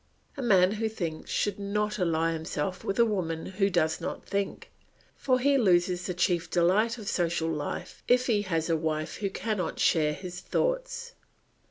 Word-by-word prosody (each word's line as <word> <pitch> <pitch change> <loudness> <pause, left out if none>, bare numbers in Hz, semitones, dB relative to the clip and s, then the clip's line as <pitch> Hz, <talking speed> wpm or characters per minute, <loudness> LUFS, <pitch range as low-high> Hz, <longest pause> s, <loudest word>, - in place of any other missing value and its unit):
A 280 - -5
man 190 -6 +5
who 220 +1 -1
thinks 170 -7 -5
should 205 -1 0
not 210 +1 -1
ally 165 -2 +1
himself 160 +2 -3
with 195 - -2
a 235 - +6
woman 170 -7 -2
who 195 +1 0
does 160 -4 +1
not - - -5
think, 200 -1 -3 0.4
for 255 -2 +2
he 280 +1 +3
loses 180 -4 +2
the 180 - -3
chief 175 -1 +1
delight 195 +8 +2
of 215 -3 -9
social 170 -3 0
life 150 -2 -5
if 250 +1 +4
he 220 -5 +2
has 165 -5 -1
a 165 - +2
wife 155 0 -2
who 200 -1 -1
cannot 205 -2 -2
share 150 -2 +3
his 180 +2 -7
thoughts. - - -2
185 Hz, 175 wpm, -28 LUFS, 165-215 Hz, 0.4 s, a